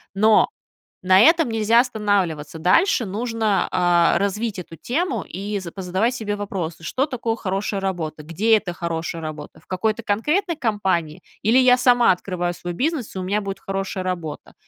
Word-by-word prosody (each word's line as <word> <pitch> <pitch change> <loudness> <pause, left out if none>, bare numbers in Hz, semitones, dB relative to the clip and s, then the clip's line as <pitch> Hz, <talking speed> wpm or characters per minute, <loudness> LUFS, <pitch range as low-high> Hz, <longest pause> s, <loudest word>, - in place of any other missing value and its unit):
но 215 +2 +4 0.6
на 185 0 +6
этом 325 - +5
нельзя 225 +1 +4
останавливаться. 200 - -1
Дальше 235 - +3
нужно, 220 0 -1
а, 175 -2 +3
развить 200 +2 -2
эту 165 -2 -9
тему 250 - -2
и 200 +3 -4
за 175 -3 -8
позадавать 190 +6 -1
себе 205 -3 -3
вопросы: 185 -6 -5
что 260 +10 0
такое 240 -5 -2
хорошая 195 -1 -3
работа, 165 -5 -3
где 200 +9 +2
это 205 -4 -1
хорошая 165 -1 -4
работа, 155 -1 -8
в - - -28
какой-то 215 +4 -1
конкретной 305 - 0
компании 190 - -1 0.2
или 225 +5 +3
я 255 -1 +6
сама 245 -4 +5
открываю 175 -1 -3
свой 175 0 -6
бизнес, 270 - -2
и - - -3
у - - -3
меня 200 +3 0
будет 195 -1 -5
хорошая 195 -1 -4
работа? 170 -5 -5
200 Hz, 165 wpm, -22 LUFS, 175-230 Hz, 0.6 s, на